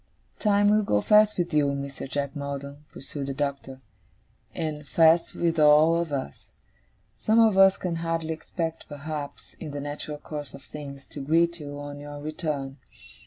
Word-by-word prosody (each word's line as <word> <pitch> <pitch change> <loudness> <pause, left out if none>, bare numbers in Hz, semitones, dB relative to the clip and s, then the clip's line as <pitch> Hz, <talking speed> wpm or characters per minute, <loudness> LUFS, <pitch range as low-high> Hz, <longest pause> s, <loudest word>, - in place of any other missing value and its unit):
'Time 205 -1 +3
will 215 0 +4
go 105 - +2
fast 210 - +5
with 175 -2 -1
you, 150 -1 +4
Mr. 140 -1 -4
Jack 140 0 -2
Maldon,' 140 0 -6
pursued 140 0 -6
the 135 - -3
Doctor, 140 -2 -3 0.7
'and 150 -2 -4
fast 165 +2 +4
with 165 -1 0
all 150 +2 +6
of 170 -2 -1
us. 130 - -5 0.7
Some 220 +1 +3
of 220 -3 +5
us 195 0 +6
can 175 -2 -3
hardly 165 -1 -2
expect, 165 0 -5
perhaps, 145 0 -6
in 160 - -6
the 145 0 -5
natural 145 +1 -5
course 145 -1 -7
of 140 - -13
things, 140 -2 -9
to - - -8
greet 170 +4 +2
you 145 -1 -7
on 145 0 -7
your 145 0 -8
return. 150 -3 -4
150 Hz, 165 wpm, -26 LUFS, 140-165 Hz, 0.7 s, all